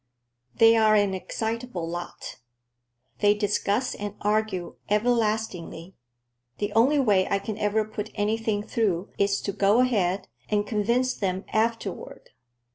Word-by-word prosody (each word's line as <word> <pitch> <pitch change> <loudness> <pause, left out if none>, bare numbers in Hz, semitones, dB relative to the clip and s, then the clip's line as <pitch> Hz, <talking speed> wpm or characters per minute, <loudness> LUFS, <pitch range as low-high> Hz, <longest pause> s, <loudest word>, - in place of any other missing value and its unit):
They 225 0 +6
are 215 -1 +5
an 205 -2 +2
excitable 220 -1 -4
lot. 175 +1 -6 0.8
They 205 0 +4
discuss 205 +3 0
and 205 0 -6
argue 210 -4 -1
everlastingly. 210 -6 -1 0.6
The 205 0 -3
only 250 +7 +4
way 205 -9 +3
I 200 - +2
can 210 +2 -5
ever 215 +1 +1
put 215 0 -6
anything 215 0 0
through 200 -5 -1
is 200 0 +2
to 200 - -2
go 200 +3 +3
ahead, 200 -7 +1 0.2
and 205 -1 +1
convince 235 +4 +1
them 190 -3 -3
afterward." 220 -3 -2
210 Hz, 125 wpm, -26 LUFS, 200-225 Hz, 0.8 s, They